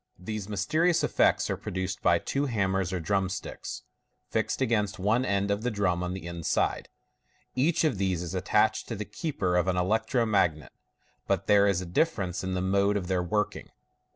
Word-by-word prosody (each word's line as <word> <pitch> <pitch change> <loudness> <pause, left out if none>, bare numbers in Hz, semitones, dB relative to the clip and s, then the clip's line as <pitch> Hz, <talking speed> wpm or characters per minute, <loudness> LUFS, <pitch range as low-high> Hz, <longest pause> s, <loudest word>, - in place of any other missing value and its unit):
These 105 +2 -5
mysterious 155 - +1
effects - - +3
are - - 0
produced 95 0 -4
by - - +4
two 140 +1 -1
hammers 95 -6 0
or 95 - -1
drum 95 +2 0
sticks, - - -6 0.5
fixed - - 0
against 110 -5 0
one 110 +6 +2
end 100 -3 0
of 100 +1 0
the 125 - 0
drum 100 -5 0
on 90 +1 -3
the 95 - -7
inside. 85 -2 -1 0.6
Each 150 +7 +2
of 145 -11 +1
these 95 -3 0
is 85 - -5
attached - - +1
to - - -4
the 105 - -4
keeper 100 - -2
of 90 +1 +2
an 90 -1 +1
electro 110 +6 +1
magnet, 85 - +1 0.6
but - - 0
there 100 0 +5
is 95 -3 +1
a - - -5
dilference 95 - 0
in 95 0 -2
the 90 - -1
mode 100 +2 +2
of 90 -2 -4
their 90 -1 +1
working. 105 +4 -2
100 Hz, 185 wpm, -28 LUFS, 90-110 Hz, 0.6 s, there